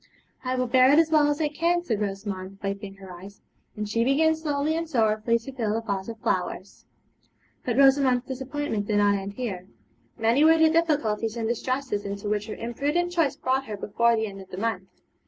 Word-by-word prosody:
'I 255 0 -1
will 255 0 0
bear 255 +2 +5
it 290 - +5
as 325 -1 +4
well 305 -2 +5
as 295 +1 -1
I 310 - +2
can,' 340 +4 0
said 220 -10 -2
Rosamond, 195 -1 -4
wiping 200 0 -4
her 190 -2 -11
eyes; 195 +3 -12 0.4
and 210 0 -3
she 230 +3 +1
began 305 +5 +3
slowly 310 -1 -1
and 330 0 -3
sorrowfully 225 -3 +2
to 235 +4 -9
fill 225 -5 -2
the 225 - -1
vase 200 -4 -3
with 230 -1 -6
flowers. 185 +1 -3 0.8
But 245 -1 -2
Rosamond's 270 -2 +4
disappointment 265 -5 -3
did 210 - +1
not 205 0 +4
end 200 0 -3
here. 200 -7 -5 0.5
Many 230 +5 +3
were 325 +1 +6
the 320 -1 +5
difficulties 245 -9 0
and 225 -1 -2
distresses 250 -2 -2
into 200 +1 -5
which 210 0 -1
her 215 - -5
imprudent 290 +9 -1
choice 330 -6 +1
brought 265 +1 -1
her 210 -4 -6
before 235 +4 +2
the 220 0 0
end 195 -2 -8
of 190 - -14
the 185 - -8
month. 195 -3 -2
235 Hz, 205 wpm, -25 LUFS, 205-285 Hz, 0.8 s, were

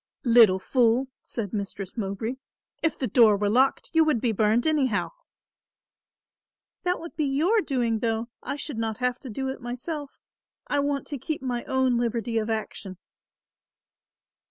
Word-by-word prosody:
"Little 230 -5 +7
fool," 245 +5 +2
said 210 -5 -5
Mistress 200 -2 -5
Mowbray, 220 +3 -3 0.4
"if 325 - 0
the 265 - -1
door 220 -2 +5
were 205 0 0
locked 260 +4 +2
you 325 -1 +6
would 305 -6 +2
be 235 0 +1
burned 220 +3 +2
anyhow." 275 -9 +1 1.7
"That 360 0 0
would 335 - -9
be 305 - 0
your 325 +11 +2
doing, 240 - 0
though. 225 0 -1
I - - -4
should 290 -4 -4
not 220 -1 -2
have 250 0 -1
to 265 - -9
do 265 +5 -3
it 265 - -6
myself. 270 +5 -5 0.6
I 290 - 0
want 285 0 -1
to 285 - -5
keep 300 +2 -4
my 245 -2 -2
own 260 -2 +2
liberty 235 -1 -1
of 215 0 -3
action." 215 -4 -4
245 Hz, 155 wpm, -26 LUFS, 220-275 Hz, 1.7 s, Little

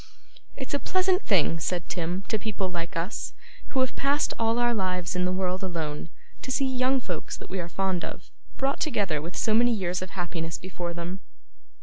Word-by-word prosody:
'It's 265 0 -5
a 285 - +3
pleasant 370 +2 +3
thing,' 165 -4 +3
said 175 +2 -1
Tim, 180 +2 -1
'to 220 - +1
people 200 -3 -1
like 170 +1 -3
us, 170 +6 -2 0.3
who 265 - +1
have 260 - +1
passed 285 +2 +2
all 225 0 +3
our 240 0 +4
lives 185 -4 0
in 180 0 +2
the 180 - +2
world 185 0 0
alone, 165 -4 -2 0.3
to - - -5
see 270 +1 +2
young 260 0 +3
folks 180 -10 -4
that - - -10
we 190 - -1
are 170 -1 -3
fond 190 0 0
of, - - -6 0.3
brought 275 +1 +1
together 200 - +1
with 170 +4 -5
so 220 - +2
many 240 +2 +6
years 180 -3 -1
of 185 - -4
happiness 165 -2 -2
before 175 -2 -4
them. 175 +2 -3
185 Hz, 200 wpm, -28 LUFS, 175-240 Hz, 0.3 s, many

